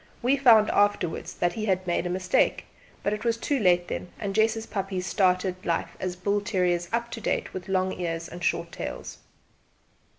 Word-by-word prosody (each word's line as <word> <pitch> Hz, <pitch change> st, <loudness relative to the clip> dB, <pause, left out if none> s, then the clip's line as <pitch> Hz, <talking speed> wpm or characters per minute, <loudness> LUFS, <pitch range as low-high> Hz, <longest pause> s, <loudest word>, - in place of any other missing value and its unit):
We 255 Hz, +3 st, +4 dB
found 230 Hz, -6 st, +6 dB
out 205 Hz, 0 st, +3 dB
after¬wards 165 Hz, -, -5 dB
that 175 Hz, 0 st, +1 dB
he 215 Hz, +2 st, -3 dB
had 185 Hz, -2 st, 0 dB
made 175 Hz, 0 st, 0 dB
a -, -, -3 dB
mistake; 185 Hz, +1 st, +1 dB, 0.4 s
but 200 Hz, -, +1 dB
it 210 Hz, -, -4 dB
was 230 Hz, -1 st, +1 dB
too 275 Hz, +4 st, 0 dB
late 175 Hz, -4 st, +3 dB
then, 180 Hz, -, -4 dB
and 200 Hz, -1 st, -3 dB
Jess's 220 Hz, +1 st, +2 dB
puppies 195 Hz, -2 st, -3 dB
started 185 Hz, 0 st, +1 dB
life 170 Hz, -, -1 dB
as 185 Hz, -1 st, -3 dB
bull 200 Hz, +3 st, 0 dB
terriers 180 Hz, -4 st, 0 dB
up 235 Hz, +1 st, -1 dB
to 225 Hz, -, -6 dB
date, -, -, -1 dB
with 185 Hz, +1 st, -7 dB
long 185 Hz, 0 st, +1 dB
ears 165 Hz, -2 st, -3 dB
and 175 Hz, 0 st, -9 dB
short 170 Hz, 0 st, 0 dB
tails. -, -, -6 dB
185 Hz, 195 wpm, -26 LUFS, 180-215 Hz, 0.4 s, found